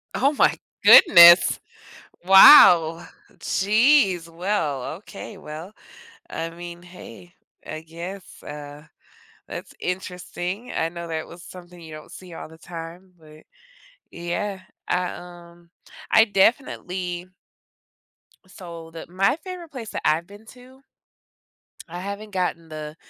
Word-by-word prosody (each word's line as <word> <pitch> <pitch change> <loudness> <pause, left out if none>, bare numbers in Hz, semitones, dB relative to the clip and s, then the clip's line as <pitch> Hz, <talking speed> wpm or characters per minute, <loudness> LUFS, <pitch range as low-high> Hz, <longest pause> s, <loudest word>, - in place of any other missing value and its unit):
Oh 280 +4 +1
my - - +2 0.3
goodness. 170 - +8 0.7
Wow. 175 - +7 0.3
Jeez. 200 - +2
Well, 165 -6 -3
okay. 205 +1 -11
Well, 160 +6 -10 0.6
I 165 0 -5
mean 175 +1 -11
hey. 180 0 -14 0.3
I 155 0 -7
guess, 170 +4 -10
uh, 145 0 -10 0.6
that's - - -9
interesting. 180 +4 -6
I 165 - -2
know 170 0 -9
that 160 -1 -5
was 170 +1 -14
something 180 -1 -14
you 160 -2 -12
don't 155 - -12
see 180 -2 -12
all 155 - -9
the 160 - -16
time. 170 +2 -11
But, 155 -1 -17 0.7
yeah. 185 +3 -5 0.3
I, 180 0 0
um, 175 -1 -14 0.4
I 220 - +6
definitely 185 -5 -1 1.2
so 170 -3 -12
the 165 0 -10
my 195 +6 +1
favorite 360 -4 -9
place 235 -5 -8
that - - -6
I've 165 +3 0
been 205 +2 -16
to, 255 +2 -17 1.1
I 175 +2 -8
haven't 200 +2 -7
gotten 175 -3 -3
the 155 0 -9
175 Hz, 120 wpm, -22 LUFS, 165-195 Hz, 1.2 s, goodness